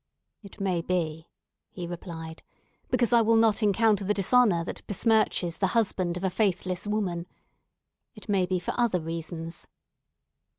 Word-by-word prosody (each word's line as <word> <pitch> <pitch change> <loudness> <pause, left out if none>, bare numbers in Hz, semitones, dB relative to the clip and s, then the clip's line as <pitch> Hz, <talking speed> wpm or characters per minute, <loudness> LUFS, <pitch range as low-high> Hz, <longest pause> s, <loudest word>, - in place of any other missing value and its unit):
"It 200 -3 -14
may 185 -4 0
be," 165 -2 -2 0.4
he 180 - -7
replied, 165 -2 -7 0.5
"because 245 -2 +1
I 235 - +6
will 225 +1 +3
not 225 -1 +3
encounter 210 0 +3
the 205 +2 0
dishonour 200 -3 +3
that - - -6
besmirches 205 -5 +1
the 190 - +3
husband 185 -5 0
of 180 - -6
a 190 - +1
faithless 185 -1 -1
woman. 185 -5 -2 0.9
It 215 - -13
may 195 -3 +2
be 185 0 0
for 180 - -3
other 230 -7 +2
reasons. 165 0 -6
185 Hz, 145 wpm, -27 LUFS, 170-215 Hz, 0.9 s, I